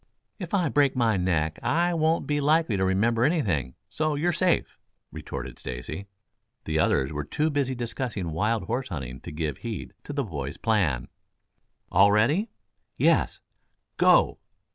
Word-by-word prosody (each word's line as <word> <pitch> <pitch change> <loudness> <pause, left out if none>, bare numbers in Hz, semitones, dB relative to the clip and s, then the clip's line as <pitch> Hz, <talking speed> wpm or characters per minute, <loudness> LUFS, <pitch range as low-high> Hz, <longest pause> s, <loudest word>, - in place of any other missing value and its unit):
"If 180 0 -3
I 180 -4 +2
break 140 -2 +2
my 115 -4 +2
neck 80 -4 0
I 175 +2 +1
won't 160 0 +1
be 145 0 0
likely 155 -5 +3
to 95 - 0
remember 110 +5 +2
anything, 100 - 0
so 155 -1 -1
you're 170 +5 +1
safe," 180 +1 +1 0.3
retorted - - -7
Stacy. 65 +10 -6 0.6
The 80 0 0
others 70 -2 +2
were 75 0 -3
too 155 - -1
busy 140 -2 0
discussing 115 - -3
wild 105 +6 0
horse 125 +6 -3
hunting 65 -7 -5
to - - -9
give 75 -1 -3
heed 115 -3 -6
to - - -6
the 140 -1 -1
boys' 70 - -5
plan. 95 - +1 0.8
"All 100 +2 +6
ready!" 145 - +2 0.5
"Yes." - - +2 0.6
"Go!" - - +4
115 Hz, 150 wpm, -26 LUFS, -, 0.8 s, All